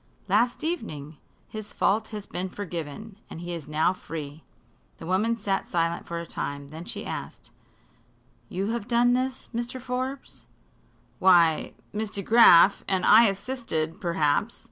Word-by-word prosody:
"Last 235 - +2
evening. 160 - -4 0.3
His 215 -1 -8
fault 220 +2 +1
has 210 -2 -7
been 185 +1 -4
forgiven, 190 +2 -7
and - - -8
he 175 +1 -5
is 165 -4 -6
now 155 +4 +2
free." 155 -4 -8 0.5
The - - -9
woman 210 +6 +1
sat 195 -3 -2
silent 170 -1 -1
for 170 - -4
a 170 - -6
time. 140 -3 -5
Then 160 +3 -9
she - - -6
asked: - - -7 1.0
"You 195 +4 -2
have 235 -2 -3
done 245 0 +3
this, 255 +1 -2
Mr. 240 +2 -3
Forbes?" 255 +2 -5 0.7
"Why, 170 -4 +4 0.2
Miss 215 0 -2
DeGraf 200 -2 +6
and 190 -2 +1
I 225 +3 +8
assisted, 195 -6 -3
perhaps. 170 +5 0
195 Hz, 145 wpm, -26 LUFS, 165-230 Hz, 1.0 s, I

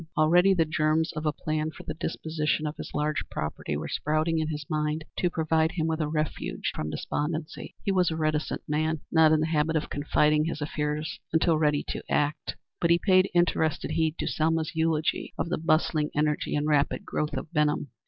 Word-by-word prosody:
Already 175 +5 +5
the 165 -2 +3
germs 155 +1 +1
of 155 0 -3
a - - +3
plan 155 0 -2
for 160 - -11
the 155 - -4
disposition 155 -1 -2
of 150 +1 -3
his - - -7
large 150 -1 0
property 75 0 -3
were 75 - -4
sprouting 155 +2 0
in 155 - -1
his 150 -2 -4
mind 155 0 -1 0.2
to 180 - +2
provide 160 -1 +1
him 165 -3 -1
with 160 0 -1
a 155 - 0
refuge 155 0 -2
from 75 - -3
despondency. 150 - -4
He 200 - +1
was 185 -2 +3
a 160 - -2
reticent 155 -1 -1
man, 155 +1 0
not 160 -1 +6
in 155 -1 +4
the - - +2
habit 160 0 +1
of 155 - -1
confiding 150 +1 +2
his 165 - -3
affairs 150 +1 -3
until 160 0 +3
ready 150 -2 +2
to - - -3
act, 145 +1 0 0.2
but 170 - +1
he 170 - +6
paid 185 +1 +4
interested 160 -3 +1
heed 160 0 +1
to - - -2
Selma's 160 +1 0
eulogy 160 -1 0
of 170 - -2
the 175 - -1
bustling 155 -1 +1
energy 150 0 0
and 145 0 0
rapid 150 -2 +1
growth 150 -1 -2
of 140 +5 -6
Benham. 150 -3 +1
155 Hz, 200 wpm, -27 LUFS, 150-160 Hz, 0.2 s, not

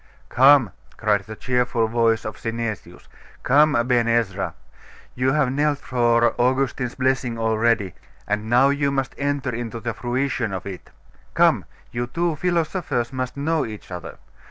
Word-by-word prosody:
'Come,' 130 -5 +5 0.3
cried 105 -3 +1
the 110 - -8
cheerful 125 -1 0
voice 115 -1 +1
of 110 - -5
Synesius, 115 -3 -5 0.4
'come, 145 +3 +4
Aben 120 0 +2
Ezra; 110 -5 0 0.6
you 130 +1 +1
have 150 -4 +2
knelt 145 +1 +1
for 120 -3 +2
Augustine's 130 -1 0
blessing 130 -2 0
already, 110 -3 +1 0.3
and 105 +1 -2
now 125 +3 +5
you 140 0 +1
must 135 -1 -2
enter 140 -3 -1
into 115 0 -5
the 115 0 -3
fruition 125 -3 -2
of 95 -1 -5
it. 95 -3 -8 0.5
Come, - - +3 0.3
you 120 +1 -3
two 170 +5 -1
philosophers 165 -7 -1
must 130 0 -4
know 155 +2 0
each 105 -3 -8
other. 90 -1 -7
120 Hz, 145 wpm, -22 LUFS, 115-135 Hz, 0.6 s, Come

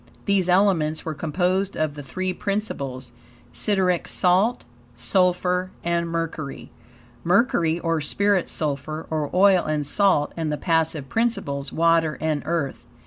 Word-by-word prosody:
These 195 -3 +2
elements 180 -5 +2
were 160 - -2
composed 180 +6 -1
of 155 -2 0
the 145 - -8
three 185 +7 -3
principles, 140 - -4 0.4
SIDERIC 190 -4 +1
SALT, 190 +7 +2 0.3
SULPHUR, 180 +7 +1
and 170 0 0
MERCURY. 165 -4 -4 0.5
Mercury, 175 -3 +2
or 165 -2 0
spirit, 200 +5 +1
sulphur, 155 +1 -3
or 155 -2 -1
oil, 190 -1 +5
and 150 -1 -1
salt, 150 -2 +2
and 160 -2 -2
the 150 - -1
passive 160 -4 0
principles, 170 - -1
water 165 -2 +2
and 155 -2 -1
earth. 165 -5 -2
165 Hz, 130 wpm, -23 LUFS, 150-185 Hz, 0.5 s, oil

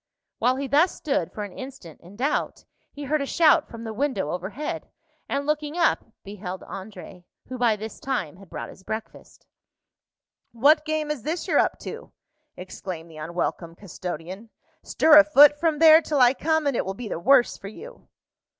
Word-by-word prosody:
While 250 +1 +2
he 275 +1 -3
thus 295 +7 +2
stood 295 -1 -2
for 210 - -6
an 200 -3 -9
instant 260 - -10
in 180 +4 -15
doubt, 270 +7 -2 0.3
he 290 - -9
heard 295 +2 0
a 280 - -3
shout 320 0 +4
from 230 -1 -9
the 220 -1 -5
window 225 - -1
overhead, 200 - -5 0.4
and 280 - -2
looking 300 +1 -2
up, 340 - +2 0.2
beheld 190 -2 -7
André, 185 -2 -10 0.2
who 255 -1 -6
by 235 -3 +3
this 215 +1 -8
time 185 - -3
had 195 -2 -16
brought - - -7
his - - -16
breakfast. 220 +3 -8 1.1
"What 295 +6 +4
game 310 -1 -2
is 295 -5 -4
this 325 - -4
you're 310 -5 +3
up - - +1
to?" - - -8 0.5
exclaimed 180 -2 -8
the 155 - -13
unwelcome 165 +1 -4
custodian. 185 +2 -8 0.3
"Stir 305 -1 +6
a - - +8
foot 295 0 +6
from 320 -2 +1
there 320 +1 +8
till 300 -3 -1
I 250 0 +6
come, 315 +3 0
and 280 -3 +1
it - - 0
will 190 0 -5
be 240 +2 -7
the 180 - -4
worse 255 +6 +4
for 195 - -9
you." 465 - -12
250 Hz, 185 wpm, -24 LUFS, 190-300 Hz, 1.1 s, a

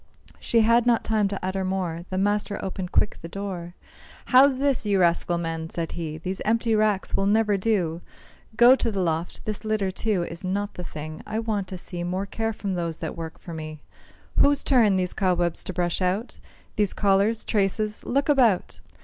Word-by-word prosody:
She 230 - +2
had 235 +2 +4
not 235 -2 +3
time 215 -2 +1
to 195 0 -4
utter 190 0 -1
more, 180 -3 -2
The 185 - -3
master 205 +1 0
opened 185 -1 -5
quick - - +1
the 165 - -7
door. 180 -2 -6 0.5
"How's 265 +1 +6
this, 275 -1 +1
you 200 -2 +1
rascal 175 0 +2
men?" 165 -1 -4
said 165 -1 -4
he; 155 -2 -5
"These 185 +4 -5
empty 230 +1 +1
racks 215 -3 +1
will 195 - +1
never 210 0 +3
do! 185 -5 0 0.6
Go 240 +3 +8
to 235 - -1
the 200 -3 -3
loft; 165 -1 -2
this 215 0 -4
litter, 215 -3 0
too, 195 -2 0
Is 170 +1 -7
not 200 +2 -2
the 180 - -7
thing. 155 -1 -7
I 215 +1 -3
want 215 -4 -2
to 185 - -6
see 175 -1 -5
More 185 +3 -2
care 225 +2 -2
from 200 -2 -4
those 170 -2 -2
that - - -5
work 165 -1 -7
for 170 - -9
me; 155 -1 -7 0.6
Whose 285 0 +4
turn 230 -8 +4
these 185 -1 0
cobwebs 175 -3 0
to - - -3
brush 175 0 -1
out? 190 +6 -1 0.4
These 210 -2 +2
collars, 205 +2 +2
traces? 210 +1 0
look 275 +2 0
about!" 250 -10 +2
195 Hz, 190 wpm, -25 LUFS, 175-215 Hz, 0.6 s, Go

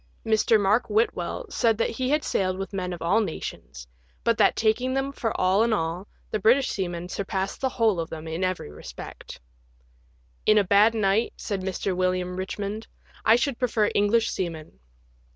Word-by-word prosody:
Mr, 220 0 +3
Mark 210 +5 +2
Whitwell 210 -5 0
said 225 -2 +2
that 225 - 0
he 255 +2 -2
had 300 +1 +2
sailed 185 -1 0
with 195 +1 -5
men 180 -2 -3
of 175 -2 -6
all 195 +7 +3
nations, 65 - -6 0.4
but 230 - +3
that, - - +5
taking 245 +4 +1
them 270 +1 -1
for 230 -5 -3
all 185 +3 +3
in 230 +1 +2
all, 175 0 -2 0.2
the 215 - 0
British 240 +6 +4
seaman 175 -2 -3
surpassed 190 +1 -3
the 265 - +1
whole 225 -7 +1
of 165 - -3
them 160 0 -7
in 160 +3 -3
every 185 - -2
respect. 75 - -10 0.5
" - - -36
In 215 - +6
a 205 - +5
bad 205 +4 +4
night," 210 +1 +1
said 200 -3 -3
Mr. 185 0 -2
William 185 0 0
Richmond, 200 +3 -4 0.2
" - - -25
I 220 - +7
should 245 +1 -1
prefer 225 -4 +1
English 210 +2 +2
seamen." 160 - -5
200 Hz, 185 wpm, -25 LUFS, 180-225 Hz, 0.5 s, I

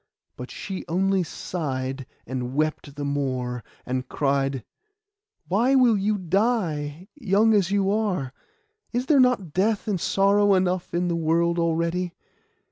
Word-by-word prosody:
But 125 - -8
she 190 -2 -6
only 190 +3 +1
sighed, 135 -7 -4 0.2
and 130 0 -4
wept 155 -1 -1
the 145 -1 -4
more, 130 -4 -2 0.2
and 130 0 -3
cried— 135 -3 0 0.8
'Why 235 +9 +3
will 250 -4 +5
you 205 +1 +1
die, 180 -5 -1
young 220 -4 +2
as 195 -4 +3
you 195 -1 +1
are? 195 -12 -1 0.6
Is 245 +1 -1
there 285 0 +4
not 245 - +2
death 210 +3 +1
and 195 -5 -1
sorrow 200 +1 +3
enough 185 -2 0
in 175 +1 +1
the 170 - 0
world 170 +1 +1
already? 170 +2 0
175 Hz, 135 wpm, -24 LUFS, 145-200 Hz, 0.8 s, will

